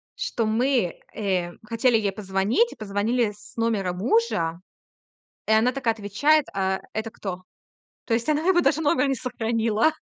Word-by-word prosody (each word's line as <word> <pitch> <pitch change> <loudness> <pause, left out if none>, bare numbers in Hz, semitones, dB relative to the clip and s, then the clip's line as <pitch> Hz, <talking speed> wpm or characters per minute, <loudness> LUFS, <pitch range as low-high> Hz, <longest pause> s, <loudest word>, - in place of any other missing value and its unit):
что 245 - -2
мы, 230 -4 +1 0.2
э, 185 -4 -1 0.2
хотели 230 0 +3
ей 200 -3 -1
позвонить, 200 - +1
и - - -12
позвонили 215 +2 0
с 205 - -16
номера 215 -5 0
мужа. 180 - 0 0.9
И - - 0
она 225 +4 +4
такая 250 -4 0
отвечает: 265 +9 +2
"Э, 190 0 0
это 220 +1 -3
кто?" 185 -4 -6 0.6
То 230 - 0
есть 235 +5 -1
она 305 0 +2
его 360 -2 +5
даже 320 -2 +2
номер 280 -2 +2
не 270 - 0
сохранила. 230 +2 0
225 Hz, 155 wpm, -24 LUFS, 200-255 Hz, 0.9 s, его